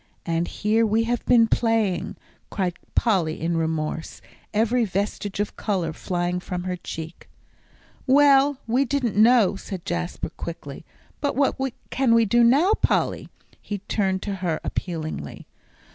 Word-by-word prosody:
and 170 0 0
here 220 +2 +1
we 220 +1 +2
have 240 +1 -1
been 235 -2 +6
playing," 225 -6 0 0.3
cried 185 -3 -1 0.2
Polly 180 -9 +1
in 170 +1 -1
remorse, 160 -1 -2 0.3
every 230 +3 +2
vestige 200 0 -3
of 205 - -2
colour 180 -6 -2
flying 175 +1 -2
from 180 0 -5
her 180 0 -2
cheek. 165 -1 -8 0.8
"Well, 280 0 +5
we 245 +4 +2
didn't 260 -4 -1
know," 220 -2 +5
said 190 -2 -7
Jasper, 175 +1 -3
quickly. 160 -3 -8 0.3
"But 285 0 -1
what 275 +1 +2 0.4
can 255 -3 +3
we 230 -1 +5
do 235 +3 +4
now, 290 - +5
Polly?" - - 0 0.3
he 205 - -4
turned 190 -3 0
to 200 -2 -3
her 165 -4 -1
appealingly. 155 - -5
205 Hz, 140 wpm, -24 LUFS, 175-235 Hz, 0.8 s, been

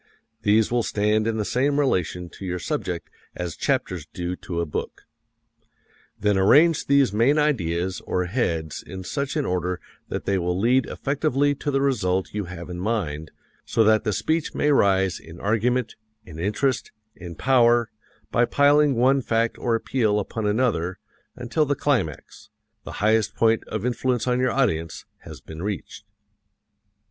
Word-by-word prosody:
These 105 +2 +3
will 120 0 +2
stand 105 0 +1
in 115 -1 -1
the 105 - -1
same 140 +6 +1
relation 90 - 0
to - - -12
your 90 -1 -2
subject 90 - -3 0.3
as 90 -3 -4
chapters 85 0 -1
do 90 0 -4
to 85 -2 -5
a 85 - 0
book. 75 - -5 1.2
Then 105 -1 +2
arrange 150 - +5
these 140 -6 +4
main 120 +8 +3
ideas 95 - 0
or 90 - 0
heads 85 - -2
in 95 -1 -8
such 140 - -3
an 150 -3 0
order 90 0 -1 0.3
that - - -4
they 100 -1 +1
will 90 +1 -1
lead 125 +4 +3
effectively 145 0 0
to 145 - -4
the 135 -1 +1
result 95 -9 0
you 105 -2 -2
have 85 -1 -8
in 90 -1 -6
mind, 85 -8 -2 0.3
so 115 - +2
that 110 0 +4
the 105 - 0
speech 155 - -1
may 150 - +2
rise 95 -8 +3
in 80 +1 -13
argument, 115 +3 0 0.3
in 80 -2 -10
interest, 105 +8 -1 0.2
in 85 -2 -9
power, 120 -1 +3 0.4
by 120 - +3
piling 145 +1 +4
one 130 +3 +3
fact 115 -1 0
or 120 -2 +1
appeal 110 -3 +1
upon 105 +1 -3
another 105 -6 0 0.4
until 125 +6 0
the 145 - +1
climax 115 - -2 0.4
the - - -7
highest 110 -1 +2
point 115 -1 +2
of 110 +1 -4
influence 125 0 0
on 125 0 +1
your 130 0 +2
audience 85 -13 -1
has - - -11
been 80 +1 -9
reached. 100 0 -5
110 Hz, 160 wpm, -24 LUFS, 90-130 Hz, 1.2 s, arrange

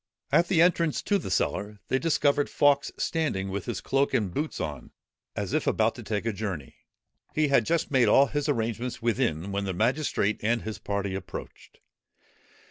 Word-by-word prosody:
At 175 - +4
the 170 -3 +4
entrance 170 -3 +2
to 200 -1 +2
the 170 - -6
cellar, 100 +4 -1
they 130 - +2
discovered 145 -3 +2
Fawkes 145 -1 +3
standing 125 - -1
with 95 0 -4
his - - -4
cloak 135 +1 +1
and 100 -6 0
boots 150 - -3
on, 75 -5 -5 0.5
as - - -3
if - - 0
about - - +2
to - - -9
take 105 0 -3
a 115 - 0
journey. 95 - -5 0.6
He 155 -1 +2
had 120 -6 +3
just 165 -2 0
made 130 -3 +4
all 140 - +6
his 145 +1 -2
arrangements 115 -2 -2
within, 110 - 0
when 100 0 -2
the 95 -2 -3
magistrate 115 - +1
and 115 +2 +1
his 110 0 -5
party 100 -1 -2
approached. 95 -1 -8
115 Hz, 180 wpm, -27 LUFS, 100-145 Hz, 0.6 s, all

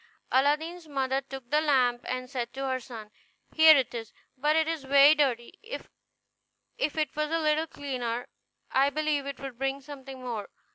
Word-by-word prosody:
Aladdin's 310 +5 +1
mother 270 -2 -1
took 270 -2 -10
the 300 +1 +4
lamp, 255 -5 +2
and 255 0 -3
said 245 -2 -4
to 270 0 -4
her 260 -1 -1
son, 225 -4 -10 0.4
"Here 315 -1 +8
it 260 -3 0
is, 225 -2 -6 0.2
but 295 +4 +1
it 320 0 +3
is 325 -3 -2
very 280 +2 +7
dirty; 255 -6 0
if 455 -4 -8
it 305 -3 -1
was 305 0 -1
a 330 - +1
little 310 0 +1
cleaner 250 -5 -4 0.4
I 270 +2 +4
believe 295 -1 -1
it 280 -1 -6
would 270 -3 -8
bring 270 0 -1
something 270 -2 -10
more." 235 -5 -5
275 Hz, 175 wpm, -28 LUFS, 255-305 Hz, 0.4 s, Here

